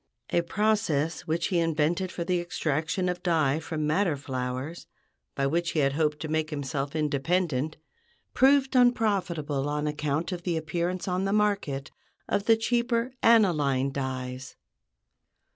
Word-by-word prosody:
A 170 - +3
process 170 -5 0
which 165 +1 0
he 180 - +2
invented 165 +3 0
for 175 - -4
the 180 0 0
extraction 165 +1 -1
of 180 0 -2
dye 155 -5 +2
from 155 -1 -3
madder 155 0 +1
flowers, 130 +3 -4 0.5
by 135 - 0
which 165 +4 0
he 155 - +1
hoped 150 +1 0
to 155 - -3
make 155 0 -1
himself 140 -1 -3
independent, 155 0 0 0.6
proved 270 0 +4
unprofitable 185 - +2
on 150 0 -1
account 150 +3 -1
of 180 -1 -4
the 170 -2 -1
appearance 170 +4 -2
on 185 +1 0
the 195 - 0
market 200 -10 0 0.4
of 200 - 0
the 225 -1 +5
cheaper 235 +1 0
aniline 150 - +3
dyes. 130 -1 -5
160 Hz, 140 wpm, -27 LUFS, 145-185 Hz, 0.6 s, the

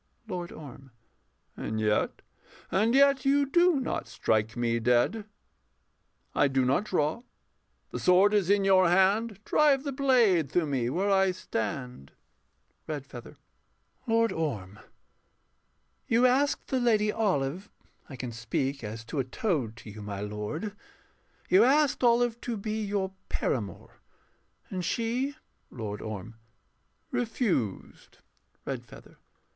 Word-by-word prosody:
LORD 180 -4 -5
ORM. 135 -2 -11 0.7
And 110 0 -4
yet 105 -1 0 0.5
and 215 +7 +2
yet 275 -1 +5
you 280 +1 +3
do 345 +1 +3
not 260 - -3
strike 110 +1 0
me 115 -1 0
dead. 125 - +2 1.1
I 145 - +3
do 135 -1 +1
not 135 +11 +1
draw: 160 +2 0 0.7
the - - -4
sword 190 +3 +4
is 200 -4 +2
in 200 -1 +3
your 185 -2 +5
hand 195 +4 +3
Drive 285 -3 +3
the 285 - -3
blade 235 - +3
through 175 -2 +2
me 130 -5 -1
where 195 +9 0
I 195 -1 +4
stand. 125 - -4 0.7
REDFEATHER. 140 -5 -7 0.7
Lord 230 0 +3
Orm, 110 -11 -4 1.3
You 235 +2 +4
asked 270 +3 +2
the 260 - +1
Lady 215 -3 +2
Olive 190 -4 -1 0.4
(I 135 - -8
can 125 -1 -5
speak 120 +4 -3
As 110 +2 -6
to 145 +5 -4
a - - +2
toad 130 - -2
to 115 -2 -11
you, 105 +1 -10
my 100 -1 -5
lord) 105 - -4 0.7
you 190 +4 +6
asked 280 +2 +3
Olive 240 -1 +3
to 235 -2 -3
be 215 +2 -3
your 200 -2 -2 0.2
paramour: 105 -8 -3 0.7
and 185 -1 -3
she 245 +8 -1 0.3
LORD 105 -4 -6
ORM. 110 +1 -7 0.7
Refused. 225 - -2 0.5
REDFEATHER. - - -8
185 Hz, 125 wpm, -28 LUFS, -, 1.3 s, you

